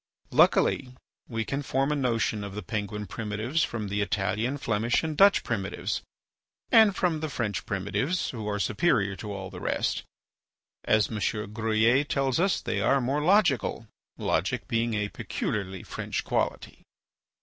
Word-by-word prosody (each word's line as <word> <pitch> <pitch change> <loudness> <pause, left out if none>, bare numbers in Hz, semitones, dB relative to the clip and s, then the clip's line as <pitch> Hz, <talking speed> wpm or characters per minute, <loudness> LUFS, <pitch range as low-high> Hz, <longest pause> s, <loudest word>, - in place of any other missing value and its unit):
Luckily 125 -2 +3 0.3
we 115 -2 -2
can 140 +5 -2
form 135 0 0
a - - +1
notion 115 -5 0
of 100 -1 -7
the 105 - -5
Penguin 105 +2 -3
primitives 110 - -2
from 110 -3 -3
the 100 +1 -1
Italian, 105 +6 -1
Flemish, 115 0 0
and 160 -1 -2
Dutch 200 +4 +6
primitives, 100 -5 -2 0.7
and 220 -3 +7
from 175 -5 +1
the 155 0 -3
French 115 -7 -3
primitives, 105 - -1
who 110 -4 -5
are 105 - -1
superior 105 - +1
to 105 - -6
all 95 -2 -6
the - - -8
rest; - - -1 0.8
as 110 -1 +3
M. 110 - -3 0.3
Gruyer 115 +4 +3
tells 135 -1 0
us 190 0 +2
they 100 - -2
are 135 +6 +3
more 135 +4 0
logical, 160 - +2 0.3
logic 100 +10 -1
being 115 -2 0
a 105 0 -1
peculiarly 95 -3 -4
French - - -4
quality. - - -2
115 Hz, 150 wpm, -27 LUFS, 105-140 Hz, 0.8 s, and